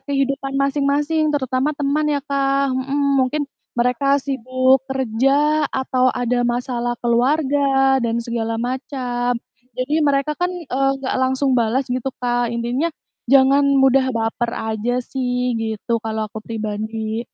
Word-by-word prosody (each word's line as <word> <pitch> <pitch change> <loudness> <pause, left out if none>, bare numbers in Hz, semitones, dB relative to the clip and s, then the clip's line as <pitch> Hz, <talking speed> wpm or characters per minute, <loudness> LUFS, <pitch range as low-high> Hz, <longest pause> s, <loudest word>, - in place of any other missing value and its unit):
kehidupan 275 0 -2
masing-masing, 290 +3 +1
terutama 280 0 0
teman 290 +2 0
ya, 290 -1 0
Kak, 275 -1 +1
mhm. 275 +1 +1
Mungkin, 260 +4 0 0.3
mereka 250 +4 +2
sibuk 260 -1 +1
kerja 270 +4 +1
atau 255 -1 +1
ada 245 -1 0
masalah 240 0 -1
keluarga 270 +2 +2
dan 230 -1 0
segala 230 -1 -2
macam. 245 0 -2 0.4
Jadi 285 +5 0
mereka 285 0 +2
kan, 355 +4 -1
eee, 275 -7 -1
enggak 270 -1 -4
langsung 260 +1 +1
balas 245 +2 +1
gitu 255 +1 -2
Kak. 245 -1 0
Intinya, 240 +7 -1 0.4
jangan 275 +1 +5
mudah 270 0 +4
baper 225 +1 -1
aja 220 +2 -2
sih, 250 -1 -1
gitu, 225 +1 -2
kalau 220 -1 -3
aku 220 - -6
pribadi. 220 0 -4
260 Hz, 130 wpm, -20 LUFS, 240-275 Hz, 0.4 s, jangan